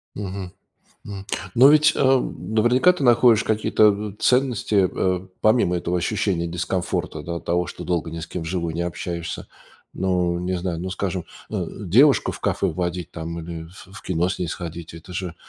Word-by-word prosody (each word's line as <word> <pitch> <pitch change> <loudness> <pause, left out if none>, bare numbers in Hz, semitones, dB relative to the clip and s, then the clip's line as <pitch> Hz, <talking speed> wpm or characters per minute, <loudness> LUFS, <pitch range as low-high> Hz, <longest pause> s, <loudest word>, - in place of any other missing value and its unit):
Мгм. 95 -2 -5 0.5
М. 100 -1 -7 0.3
Но 130 +4 +7
ведь, 150 0 +5
эм, 130 -4 +1
наверняка 120 +9 +5
ты 165 - -4
находишь 120 -2 +5
какие-то 110 0 +3
н 105 0 -3
ценности, 120 -7 +2
э, 95 0 -1
помимо 110 -5 +3
этого 85 +1 -1
ощущения 90 -1 0
дискомфорта, 85 -2 -2
да, 85 +3 -5
от 85 0 -7
того, 90 +1 0
что - - -8
долго 85 -2 -1
ни 85 +1 -6
с 80 - -6
кем 90 - -5
вживую 85 0 -3
не 85 - -2
общаешься. 85 -1 -4 0.5
Но, 90 -2 0
не 90 +1 -2
знаю, 85 -2 -3
ну, 95 +2 -4
скажем, 95 -2 -3 0.2
ну, - - -3 0.2
девушку 130 - +5
в - - -9
кафе - - 0
водить 85 +1 -3
там 85 0 -5
или 80 0 -7
ф 90 +2 -14
в - - -10
кино 90 -1 0
с 90 - -4
ней 90 - -1
сходить. 85 -1 -6
Это 85 +2 -11
же, 90 -2 -4
90 Hz, 180 wpm, -23 LUFS, 85-105 Hz, 0.5 s, Но